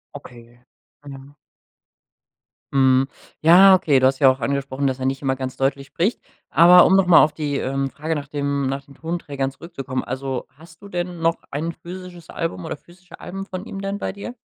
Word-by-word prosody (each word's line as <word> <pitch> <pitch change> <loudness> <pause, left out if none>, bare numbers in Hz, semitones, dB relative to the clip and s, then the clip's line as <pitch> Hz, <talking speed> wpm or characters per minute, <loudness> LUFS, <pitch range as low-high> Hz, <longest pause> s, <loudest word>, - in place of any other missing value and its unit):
Okay. 120 -1 -13 0.4
Genau. 140 0 -12 1.4
Mhm. 130 -1 +4 0.3
Ja, 185 +5 +8
okay. 155 -7 +3
Du 130 - +2
hast 130 0 +2
ja 135 -3 +6
auch 130 +1 0
angesprochen, 135 +2 -2
dass 130 -1 -1
er 130 - -3
nicht 135 0 -2
immer 135 -2 0
ganz 130 0 -6
deutlich 135 0 -1
spricht. 195 +8 -1 0.3
Aber 175 +2 +7
um 190 - +4
noch 195 -2 +3
mal 175 - +8
auf 150 - +1
die, 145 -3 -3
ähm, 135 +1 -2
Frage 155 +4 -4
nach 145 -2 -5
dem 140 -1 -2
nach 135 +1 -3
den 140 - -17
Tonträgern 145 -5 -4
zurückzukommen. 135 -4 -6
Also 130 0 -4
hast 160 +2 -18
du 200 - -11
denn 175 -2 -4
noch 165 0 +1
ein 155 +4 -3
physisches 175 0 -11
Album 90 - -4
oder - - -5
physische 175 +3 -17
Alben 195 +1 -7
von 185 +1 -7
ihm 195 -3 -7
denn 195 0 -3
bei - - -4
dir? 205 +5 -8
145 Hz, 195 wpm, -21 LUFS, 135-175 Hz, 1.4 s, Ja